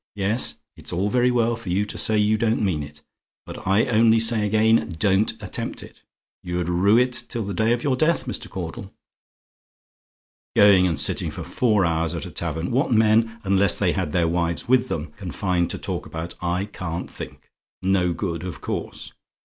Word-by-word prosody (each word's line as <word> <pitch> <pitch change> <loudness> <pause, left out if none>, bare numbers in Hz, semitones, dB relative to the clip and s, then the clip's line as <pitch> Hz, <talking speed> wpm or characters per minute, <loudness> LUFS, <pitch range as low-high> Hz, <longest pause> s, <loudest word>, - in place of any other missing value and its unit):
Yes 105 +5 0 0.2
it's - - -8
all 95 +4 -1
very 125 0 +3
well 120 -1 +1
for 115 -5 -9
you 95 +4 +1
to - - -8
say 110 - +2
you 105 +1 +3
don't 110 +1 +1
mean 90 -8 0
it, 75 +1 -10 0.4
but - - -9
I 100 +5 +3
only 115 -2 +4
say 110 -2 +2
again, 110 -3 +2
don't 95 +4 +2
attempt 105 -4 -5
it. - - -15 0.4
You'd 90 -1 -3
rue 95 +5 +3
it 125 +1 +2 0.2
till 115 - -2
the 100 - -4
day 110 +4 +1
of 120 0 0
your 135 -3 +1
death, 155 +5 +1
Mr. - - -5
Caudle. - - -7 1.6
"Going 100 -3 +6
and 80 -5 -1
sitting - - +2
for - - -7
four 105 -6 +1
hours 80 -1 0
at - - -5
a - - -8
tavern! 80 +2 -3
What 135 +5 +1
men, 115 0 +3
unless 95 -1 +3
they - - +1
had 75 - -2
their 85 0 +1
wives 85 0 -1
with 130 0 +3
them, 80 -8 -4
can 95 -3 -7
find 90 -2 -1
to - - -2
talk - - -5
about, 80 +1 -5
I 90 +2 -1
can't 90 -4 -5
think. - - -10 0.3
No 95 -2 +2
good, 85 -2 -4
of 90 -5 -6
course. - - -5
100 Hz, 190 wpm, -23 LUFS, 90-115 Hz, 1.6 s, Going